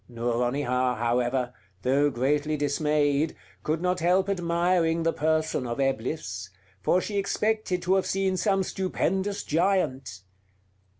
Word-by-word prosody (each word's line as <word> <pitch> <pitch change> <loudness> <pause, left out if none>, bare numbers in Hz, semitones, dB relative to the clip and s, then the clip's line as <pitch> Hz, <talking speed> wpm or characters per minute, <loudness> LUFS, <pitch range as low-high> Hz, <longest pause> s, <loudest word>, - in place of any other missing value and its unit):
Nouronihar, 125 +2 0
however, 120 +2 0 0.3
though 140 +3 +3
greatly 145 +4 0
dismayed, 145 +1 +1 0.3
could 160 +3 -2
not 180 0 +1
help 185 +3 +2
admiring 170 -2 +1
the 165 0 +1
person 155 -4 0
of 120 +3 -4
Eblis; 115 -7 -2 0.3
for 175 - +3
she 200 +2 -2
expected 205 -2 -1
to 185 - +2
have 190 -1 +2
seen 190 -1 0
some 195 +1 +1
stupendous 190 +2 -1
giant. 150 - 0
155 Hz, 120 wpm, -26 LUFS, 130-185 Hz, 0.3 s, though